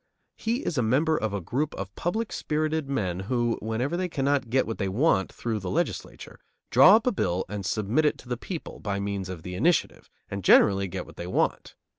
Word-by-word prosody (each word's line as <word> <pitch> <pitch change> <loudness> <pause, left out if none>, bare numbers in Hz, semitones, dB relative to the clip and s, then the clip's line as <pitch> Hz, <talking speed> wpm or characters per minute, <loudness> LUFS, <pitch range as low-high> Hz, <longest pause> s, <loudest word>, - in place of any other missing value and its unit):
He 235 +5 -2
is 155 - -1
a - - +3
member 140 +8 +2
of 110 -7 -1
a 100 - -2
group 130 - -2
of 95 0 -6
public 215 +6 -2
spirited 155 -1 -1
men 95 -10 -1
who, 120 +3 -1
whenever 115 +8 -1
they 180 0 -1
cannot 140 -4 0
get 130 +2 +2
what 115 - -5
they 95 -2 0
want 100 -2 +2
through 115 -2 -3
the 95 -2 -5
legislature, - - -3 0.3
draw 160 - +8
up 225 - +2
a 250 - +3
bill 90 - -1
and 105 0 -5
submit 110 +10 0
it 150 - +2
to - - -15
the 125 - -1
people, 160 +7 -7
by 100 -1 -3
means 100 -2 -3
of 90 -4 -7
the 90 - -6
initiative, 170 - 0 0.2
and 100 -1 -5
generally 100 +1 +5
get 90 0 -5
what - - -15
they 85 - -5
want. 90 - -1
115 Hz, 215 wpm, -26 LUFS, 100-155 Hz, 0.3 s, draw